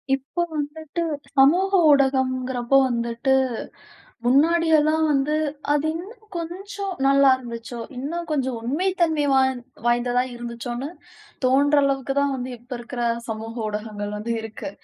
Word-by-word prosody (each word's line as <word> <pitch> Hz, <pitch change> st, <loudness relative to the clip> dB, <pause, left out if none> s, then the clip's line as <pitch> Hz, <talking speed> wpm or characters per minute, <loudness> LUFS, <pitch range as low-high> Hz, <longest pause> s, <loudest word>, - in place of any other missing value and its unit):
இப்போ 275 Hz, +6 st, -4 dB, 0.2 s
வந்துட்டு 315 Hz, +3 st, -3 dB, 0.3 s
சமூக 345 Hz, +9 st, +5 dB, 0.2 s
ஊடகம்ங்கிறப்போ 260 Hz, -2 st, +2 dB
வந்துட்டு, 235 Hz, +2 st, 0 dB, 0.9 s
முன்னாடி 325 Hz, +7 st, +4 dB
எல்லாம் 310 Hz, +1 st, +2 dB
வந்து 285 Hz, +2 st, +1 dB, 0.4 s
அது 295 Hz, +1 st, +1 dB
இன்னும் 430 Hz, +6 st, -9 dB
கொஞ்சம் 385 Hz, +4 st, -5 dB
நல்லா 275 Hz, 0 st, +6 dB
இருந்துச்சோ, 235 Hz, -1 st, -7 dB, 0.2 s
இன்னும் 335 Hz, +6 st, -4 dB
கொஞ்சம் 260 Hz, -5 st, -1 dB
உண்மை 290 Hz, +11 st, -1 dB
தன்மை 320 Hz, -3 st, +2 dB
வாய்ந் 265 Hz, -2 st, +2 dB, 0.2 s
வாய்ந்ததா 245 Hz, +1 st, +2 dB
இருந்துச்சோன்னு 240 Hz, +2 st, -5 dB, 0.6 s
தோணுற 285 Hz, +3 st, +4 dB
அளவுக்கு 270 Hz, -1 st, 0 dB
தான் 280 Hz, -1 st, +1 dB
வந்து 255 Hz, 0 st, -5 dB
இப்போ 245 Hz, +2 st, -8 dB
இருக்கற 240 Hz, 0 st, -5 dB, 0.3 s
சமூக 225 Hz, +1 st, -5 dB
ஊடகங்கள் 210 Hz, -1 st, -4 dB
வந்து 220 Hz, +3 st, -4 dB
இருக்கு. 220 Hz, +6 st, -7 dB
270 Hz, 120 wpm, -23 LUFS, 240-300 Hz, 0.9 s, நல்லா